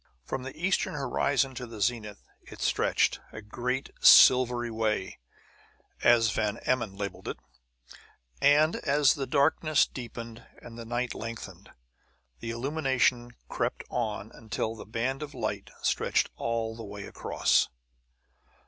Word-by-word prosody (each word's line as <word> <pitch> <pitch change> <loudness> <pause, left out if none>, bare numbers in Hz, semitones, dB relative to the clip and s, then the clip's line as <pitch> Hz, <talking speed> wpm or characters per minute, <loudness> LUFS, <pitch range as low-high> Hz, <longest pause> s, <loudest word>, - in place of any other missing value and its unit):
From 135 - -4
the 135 +3 -8
eastern 190 -2 0
horizon 135 0 0
to 125 -1 -6
the 115 -2 -10
zenith 105 -1 -2 0.2
it - - -13
stretched, - - +1
a - - -8
great 125 +5 -3
"Silvery 125 -2 +7
Way," 110 -4 -2 0.8
as 115 -2 +5
Van 105 0 -1
Emmon 115 -6 0
labeled 100 -1 -6
it; - - -4 1.0
and 150 +3 +4
as 145 -1 +3
the 135 -2 -4
darkness 155 +1 +3
deepened 115 -2 -8 0.2
and 115 - -12
the 115 0 -8
night 120 +1 -2
lengthened, 115 0 -8 0.7
the 115 - -6
illumination 125 -1 0
crept - - -2
on 110 -3 -3
until 110 0 -4
the 110 - -10
band 125 +5 -2
of 150 -1 -7
light - - -3
stretched - - +1
all 115 -1 -2
the 115 - -8
way 100 -1 -8
across. - - +1
120 Hz, 130 wpm, -28 LUFS, 110-135 Hz, 1.0 s, Silvery